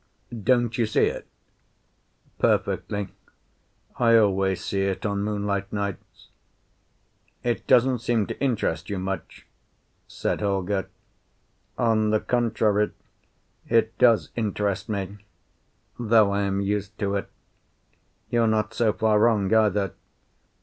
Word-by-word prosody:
Don't 120 -1 +2
you 115 - +2
see 110 - +3
it?" - - -4 1.1
"Perfectly; 100 -2 0 0.9
I 115 -1 +5
always 95 -3 +1
see 100 - -1
it 95 -1 -2
on 100 -1 -1
moonlight 100 -1 -2
nights." 100 -2 -5 1.1
"It 120 -1 -2
doesn't 125 0 +4
seem 115 -2 0
to - - -7
interest 125 -6 -1
you 100 - -2
much," 95 -1 -5 0.6
said - - -3
Holger. 100 -2 -1 0.9
"On 110 -3 +2
the 110 0 +2
contrary, 110 -4 +1 0.7
it 115 -1 +2
does 120 -3 +4
interest 105 -2 -2
me, 100 -1 -4 0.8
though 110 -3 +4
I 100 0 0
am 100 0 -1
used 100 +1 -2
to 100 -1 -1
it. 100 - -2 1.0
You're 115 -1 +3
not 110 0 0
so 115 -2 +2
far 110 -1 +2
wrong, 110 -3 +3
either. 105 -3 +2
105 Hz, 115 wpm, -25 LUFS, 100-115 Hz, 1.1 s, I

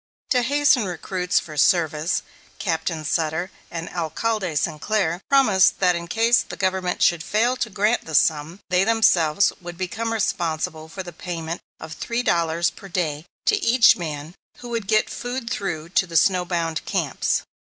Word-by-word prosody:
To 250 -3 +4
hasten 280 -2 +3
recruits 180 0 -1
for 155 - -9
service, 160 +1 +2 0.3
Captain 160 -3 -2
Sutter 160 +4 -1 0.2
and 165 0 -5
Alcalde 180 +2 -2
Sinclair 175 +3 -1
promised 220 -9 +4
that 180 -2 +3
in 170 0 -5
case 230 +5 +3
the - - -8
Government 185 -1 -1
should 170 -2 +3
fail 235 +6 +1
to 235 - -2
grant 210 +3 +1
the 160 - -4
sum, 155 +6 +1
they 180 +1 +4
themselves 200 -6 +3
would 175 -1 -8
become 220 +5 -3
responsible 160 -6 -2
for 190 +3 -6
the 175 -1 -9
payment 165 0 -5 0.2
of 160 - -8
three 235 +9 -3
dollars 170 -4 +1
per 195 - -12
day 165 -3 -2 0.2
to 420 -2 +2
each 235 0 +6
man 155 -2 -6 0.2
who 245 - -9
would 230 -4 -3
get 215 0 +3
food 245 0 -5
through 170 -8 -3
to 190 +1 +1
the 165 -1 0
snow 180 +2 +3
bound 165 -3 -2
camps. - - -1
180 Hz, 165 wpm, -23 LUFS, 165-215 Hz, 0.3 s, each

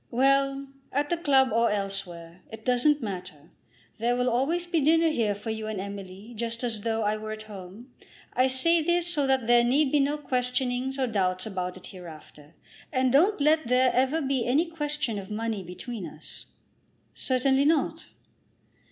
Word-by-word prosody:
"Well; 275 +2 +2 0.3
at 290 +2 0
the 345 - +2
club 270 -5 +3
or 230 +1 +3
elsewhere. 185 -4 -4
It 220 0 -10
doesn't 255 +3 +3
matter. 180 -7 -7 0.5
There 240 +2 +1
will 250 0 +1
always 305 +9 0
be 340 -2 0
dinner 325 +3 +4
here 225 -9 0
for 210 +3 -5
you 220 0 -4
and 215 -3 -3
Emily, 200 +2 -8
just 230 +1 -4
as 225 -4 -3
though 225 0 -1
I 210 +1 0
were 215 0 -6
at 215 0 -8
home. 210 +4 -11 0.4
I 255 +1 +3
say 325 +6 +2
this, 345 +2 +1
so 300 -6 0
that 265 -3 +2
there 240 +1 +5
need 265 +3 +2
be 295 - +3
no 285 +2 +1
questionings 255 -1 -1
or 265 - +1
doubts 185 -5 -1
about 185 -3 -4
it 185 - -13
hereafter. 155 -4 -12 0.4
And 255 -1 +2
don't 365 +8 +4
let 305 -1 +3
there 250 +1 +4
ever 265 +5 +1
be 265 -2 0
any 275 +8 +2
question 295 -8 -3
of 190 - -9
money 220 -1 -3
between 185 +4 -7
us." - - -13 0.7
"Certainly 265 +1 +1
not." 315 +1 +1
245 Hz, 175 wpm, -27 LUFS, 210-275 Hz, 0.7 s, there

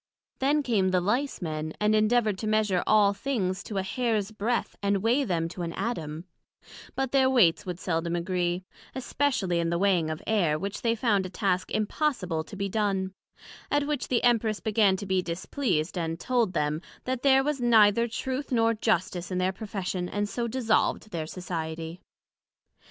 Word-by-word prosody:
Then 285 +2 +2
came 210 -7 +2
the 185 0 +2
Lice 235 +5 -1
men, 155 -1 -3
and 210 0 +3
endeavoured 215 -2 +2
to 215 - -3
measure 215 -4 +2
all 205 -2 +5
things 200 -5 -2
to 205 - -5
a 190 - 0
hairs 220 -1 -1
breadth, 220 +3 -1
and 200 -1 +1
weigh 245 +5 +3
them 170 -8 -1
to 180 - -7
an 170 -1 -3
Atom; 165 -7 -4 0.7
but 265 -1 -1
their 265 -1 +4
weights 195 -8 +3
would 180 -1 -4
seldom 170 -1 -1
agree, 175 +1 -1 0.3
especially 250 -9 0
in 165 0 0
the 170 - 0
weighing 180 -4 +2
of 155 0 -3
Air, 180 -9 +2
which 200 +5 -4
they 230 -1 +1
found 210 -5 +1
a - - -10
task 185 -2 -1
impossible 210 - -1
to 200 - -10
be 200 0 -2
done; 195 -2 -1 0.6
at 290 0 +1
which 295 -3 -2
the 245 - +1
Empress 225 -3 +2
began 210 -3 +3
to 200 - -6
be 190 -1 +1
displeased, 175 - -2
and 165 -1 -2
told 235 -5 +1
them, 150 -1 0 0.2
that 255 -1 -2
there 270 -1 +5
was 290 -2 -1
neither 230 -1 +5
Truth 260 +4 -4
nor 230 -2 +3
Justice 185 -5 -1
in 185 - -2
their 185 +1 +1
Profession; 190 -3 -4
and 205 0 -1
so 235 +3 -2
dissolved 225 -2 0
their 160 -3 -3
society. 165 -1 -5
200 Hz, 180 wpm, -27 LUFS, 180-235 Hz, 0.7 s, all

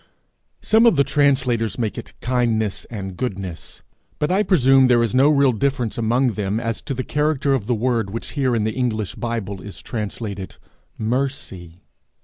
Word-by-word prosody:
Some 225 +2 +5
of 230 - +5
the 140 - +4
translators 135 -5 +1
make 115 -4 -2
it - - -10
kindness 115 -5 0
and 95 -5 -6
goodness; 95 -7 -6 0.3
but 150 - 0
I 190 +3 +3
presume 135 -9 +5
there 120 -2 +4
is 115 - -1
no 135 +3 +5
real 140 -3 +4
difference 125 -1 -1
among 120 +3 +2
them 105 -1 -2
as 115 -2 -3
to 135 - -3
the 130 - -2
character 150 -1 0
of 115 -6 -1
the 120 - +1
word 115 -2 0
which 115 +4 -5
here, 130 -4 0
in 110 - +1
the 110 0 -1
English 110 -6 -1
Bible, 110 -5 -4
is 100 - -9
translated 105 -3 -5 0.4
mercy. 110 -8 -3
120 Hz, 170 wpm, -21 LUFS, 105-135 Hz, 0.4 s, Some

